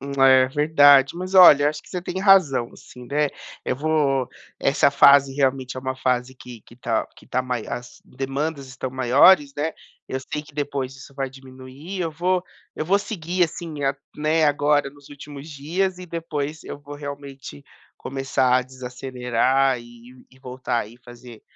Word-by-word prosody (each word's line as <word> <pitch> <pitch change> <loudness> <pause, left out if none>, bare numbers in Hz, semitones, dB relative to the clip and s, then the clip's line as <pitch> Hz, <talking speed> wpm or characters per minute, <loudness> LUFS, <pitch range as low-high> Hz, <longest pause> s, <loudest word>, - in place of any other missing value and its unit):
Hum, 140 +1 -6
é, 130 -1 +6
verdade. 145 -1 +5
Mas, 185 +2 -6
olha, 170 -6 +8
eu - - +4
acho 150 0 -5
que - - -19
você 180 - -4
tem 180 +1 -5
razão 185 - +3
sim, 125 0 -14
né, 145 +3 0 0.4
eu 125 - -2
vou 140 -3 0 0.3
essa 135 +1 +3
fase 140 -1 +5
realmente 135 -2 -1
é - - -4
uma 130 0 -3
fase 130 0 -1
que 125 -2 -12
que 120 - -18
tá 115 -2 -1
que - - -18
tá 130 - -1
mai 125 -3 -4
as 120 0 -7
demandas 140 +2 -4
estão 130 0 -6
maiores, 140 +5 +4
né, 155 +3 -2 0.4
eu 130 - -3
sei 150 +3 -5
que 150 0 -18
depois 140 -2 -3
isso 135 +1 -14
vai 135 -1 -3
diminuir, 130 +7 -10
eu 165 -2 -1
vou 180 +3 0 0.3
eu - - -4
vou 195 +5 +3
seguir, 180 -3 -1
assim, 160 -2 -7
a 135 0 +1 0.2
né, 155 +1 +1
agora 145 -1 +2
nos 145 0 -18
últimos 145 +1 -11
dias 175 +6 -2
e 180 - -9
depois 160 -3 -5
eu - - -7
vou 145 0 -10
realmente 140 - -9 0.3
começar 130 -1 0
a - - -1
desacelerar 130 0 -1
e 120 +1 -16
e 130 - -21
voltar 130 -1 -3
aí 110 +2 -9
e - - -21
fazer 120 -2 -13
140 Hz, 180 wpm, -22 LUFS, 130-150 Hz, 0.4 s, olha